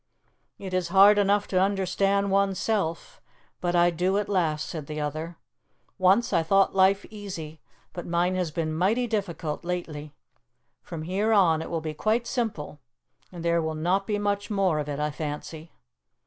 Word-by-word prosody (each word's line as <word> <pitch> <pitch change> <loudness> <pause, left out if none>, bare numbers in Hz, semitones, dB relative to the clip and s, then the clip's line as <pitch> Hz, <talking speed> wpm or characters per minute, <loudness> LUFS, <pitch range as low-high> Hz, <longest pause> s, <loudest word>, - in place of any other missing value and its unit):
"It 190 -2 -7
is 185 -1 0
hard 200 +3 +6
enough 205 0 +2
to 185 -1 +2
understand 195 +1 +1
oneself, 195 - -1 0.4
but 175 0 -1
I 175 0 +4
do 180 +4 0
at 205 - -1
last," 165 -6 0
said 155 -4 -6
the 155 0 -5
other. 155 +3 -4 0.6
"Once 190 +6 +3
I 170 - +4
thought 195 +4 +3
life 195 +1 +3
easy, 170 -7 -8 0.3
but 175 - -7
mine 175 +2 +1
has 180 -3 -1
been 155 0 -3
mighty 200 +10 +1
difficult 185 -9 -3
lately. 155 -4 -5 0.7
From 165 -3 -7
here 195 +6 0
on 170 -6 +4
it - - -6
will 165 -1 -2
be 155 -1 -4
quite 220 +9 0
simple. 220 - -3 0.5
And 170 -2 -8
there 170 0 +2
will 160 0 -3
not 180 +5 0
be 210 -2 0
much 205 0 -1
more 195 -7 +1
of 150 0 -4
it, 145 0 -3
I 150 0 -1
fancy." 155 +2 -6
180 Hz, 170 wpm, -26 LUFS, 160-200 Hz, 0.7 s, hard